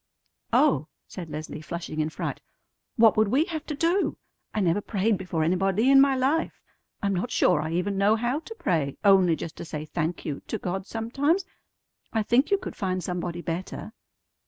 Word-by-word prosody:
"Oh!" - - +3 0.2
said 175 -4 -8
Leslie, 155 0 -6
flushing 165 -1 -5
in 155 0 +1
fright, - - -4 0.5
"what 225 -2 +6
would 215 0 +4
we 270 +9 +3
have 320 -3 -5
to 300 - -3
do? 340 +6 +1 0.3
I - - -2
never 185 0 +2
prayed 210 +1 +1
before 180 -4 -2
anybody 195 +8 +2
in 270 0 +8
my 275 -1 +4
life. 275 +6 0 0.4
I'm 200 0 +1
not 195 +7 -1
sure 150 - +3
I 160 +1 -3
even 195 +3 -1
know 205 +2 +4
how 240 +5 0
to 390 +8 -10
pray, 150 - 0
only 190 -4 +6
just 160 - -7
to - - -6
say 155 -1 -5
'Thank 160 +2 -3
you' 145 -2 -4
to 220 - -2
God 190 0 -4
sometimes. 280 - 0 0.7
I 220 -1 +1
think 240 +6 +3
you 400 - +4
could - - -7
find 185 -2 -2
somebody 175 -1 -3
better." 185 +5 -5
195 Hz, 185 wpm, -26 LUFS, 170-245 Hz, 0.7 s, in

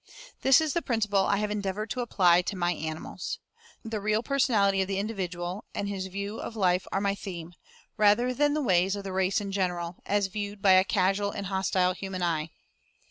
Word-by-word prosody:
This 270 -1 +6
is 315 -2 -1
the 340 - 0
principle 210 -7 +1
I 200 - +2
have 210 0 -1
endeavored 210 +1 -3
to 255 - -2
apply 180 -7 +4
to 190 - -4
my 175 -1 +1
animals. 155 -1 -5 0.5
The 220 -2 -3
real 215 +2 +1
personality 215 -9 +2
of 190 - -1
the 195 -1 -2
individual, 185 -2 -4
and 200 - -2
his 195 -2 -3
view 200 +3 -5
of 230 - -6
life 185 -3 +1
are - - +1
my 200 0 +1
theme, 175 -4 -7 0.4
rather 215 +4 +4
than 290 +3 +2
the 305 - 0
ways 190 -3 +3
of 200 - -6
the 195 -1 -5
race 190 +1 +1
in 200 -1 -5
general, 180 -3 -2
as 205 0 +2
viewed 205 +1 -5
by 195 -1 +4
a 185 0 +7
casual 195 +1 +1
and 200 0 -5
hostile 190 -1 +1
human 190 -1 -5
eye. 160 -2 0
195 Hz, 200 wpm, -28 LUFS, 185-210 Hz, 0.5 s, a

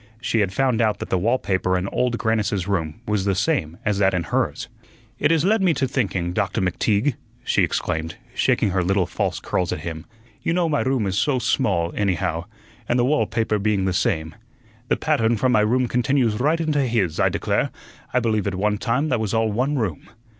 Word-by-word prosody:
She 115 -1 0
had 100 -3 +1
found 125 +2 +1
out 110 -2 +2
that - - -7
the 95 - +3
wall 115 +8 +2
paper 95 -4 0
in 90 +2 -2
Old 125 -2 0
Grannis's 105 -5 0
room 80 -6 -2
was 105 -2 0
the 100 -1 +1
same 95 - 0
as 105 -1 +1
that 95 -2 +3
in 90 - 0
hers. 80 - -1 0.5
"It 145 - +3
has 165 0 +2
led 215 +2 +3
me 180 -5 +3
to 135 0 0
thinking, 95 -9 -1
Doctor 90 +1 -1
McTeague," 100 +8 +1 0.3
she - - +1
exclaimed, 80 0 -2 0.2
shaking 100 - +2
her 95 0 +1
little 95 +1 +2
false - - -2
curls 90 -1 -1
at - - -3
him. 80 -1 -6 0.3
"You 165 - 0
know 175 -1 +2
my 150 -2 +1
room 130 -4 0
is 95 0 0
so 145 -3 +1
small, 100 -8 0
anyhow, 95 -5 -1 0.4
and 120 - +2
the 120 - +3
wall 150 +3 +2
paper 110 -2 0
being 100 -2 +1
the 95 - 0
same 85 -6 0 0.5
the - - +1
pattern 120 -7 +1
from 130 +3 +2
my 110 - +4
room 125 +4 +2
continues 120 -2 +1
right 155 +6 +2
into 155 -3 +1
his 110 - 0
I - - +4
declare, - - 0 0.4
I 125 - +2
believe 110 -4 0
at 100 - -1
one 105 +2 0
time 130 +7 0
that 125 - +1
was 110 0 -1
all 110 -1 +2
one 130 +7 0
room. 105 - -3
110 Hz, 210 wpm, -22 LUFS, 95-130 Hz, 0.5 s, my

